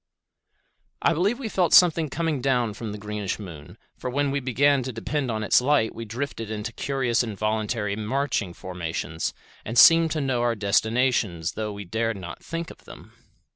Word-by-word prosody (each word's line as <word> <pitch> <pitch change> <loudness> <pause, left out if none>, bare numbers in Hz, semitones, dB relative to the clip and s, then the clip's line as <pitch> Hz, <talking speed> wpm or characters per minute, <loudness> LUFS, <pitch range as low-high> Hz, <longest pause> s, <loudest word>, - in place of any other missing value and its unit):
I - - +4
believe 195 +9 +1
we 260 -4 -5
felt 185 -5 +1
something 165 -3 +5
coming 160 -2 -1
down 125 -4 +1
from 110 +1 -6
the 105 - -6
greenish 105 -1 -4
moon, 85 -8 -10 0.2
for 125 - -5
when 140 +2 0
we 140 - 0
began 140 +2 +2
to 130 +1 -4
depend 130 +4 -3
on 110 -1 -2
its 105 - +4
light 130 -4 +2
we 115 - -7
drifted 115 -1 -5
into 110 +1 -4
curious 125 -3 0
involuntary 110 -1 -2 0.6
formations 85 -3 -4 0.3
and 115 +3 -4
seemed 165 +5 +8
to 155 - -2
know 130 -3 0
our 120 -1 +1
destinations 105 -4 +1
though 110 -1 -4
we 100 0 -7
dared 110 +3 -1
not 90 -2 -9
think 165 +1 -5
of - - -17
them. - - -13
120 Hz, 175 wpm, -25 LUFS, 105-140 Hz, 0.6 s, seemed